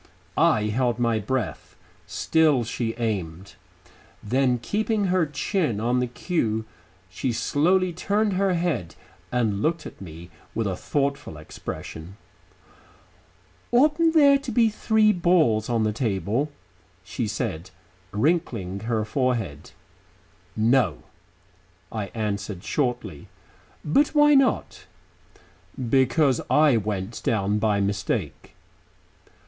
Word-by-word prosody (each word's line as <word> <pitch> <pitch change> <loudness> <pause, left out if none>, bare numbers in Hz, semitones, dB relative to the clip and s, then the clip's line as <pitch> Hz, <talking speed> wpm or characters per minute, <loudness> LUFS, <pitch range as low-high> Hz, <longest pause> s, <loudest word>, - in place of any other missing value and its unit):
I 105 - +3
held 120 +3 0
my 115 -2 +1
breath.... 125 +4 -3 0.3
Still 155 -6 +2
she 115 0 -3
aimed.... 95 -6 -3 0.7
Then 125 +3 +2
keeping 210 - -1
her 180 -4 +2
chin 150 - -1
on 120 +3 +1
the 125 - 0
cue, 115 - -2 0.4
she 120 +7 -3
slowly 175 +9 +1
turned 205 +4 0
her 190 0 +1
head 140 - -2 0.4
and 110 -5 0
looked 165 +7 0
up - - -7
at - - -22
me 85 -1 -10 0.2
with 115 - 0
a 95 -2 -1
thoughtful 140 - -2
expression. 80 +3 -8 1.5
"Oughtn't 305 +6 +3
there 280 -3 +6
to 275 -3 -6
be 230 0 +4
three 215 0 +3
balls 165 - +2
on 115 -2 +1
the 110 -1 0
table?" 115 +5 -1 0.5
she 110 +4 -3
said, 100 -5 -4 0.4
wrinkling 110 - 0
her 110 -2 0
forehead. 110 - -2 0.9
"No," 110 - +2 0.9
I 110 -3 -3
answered 100 -4 -3
shortly. 125 -6 -2 0.6
"But 285 - +2
why 295 0 +6
not?" 270 -2 +1 0.9
"Because 130 +2 +2
I 150 -4 +5
went 105 0 -3
down 105 -1 +1
by 105 -2 +1
mistake." 100 0 -3
120 Hz, 110 wpm, -24 LUFS, 105-165 Hz, 1.5 s, there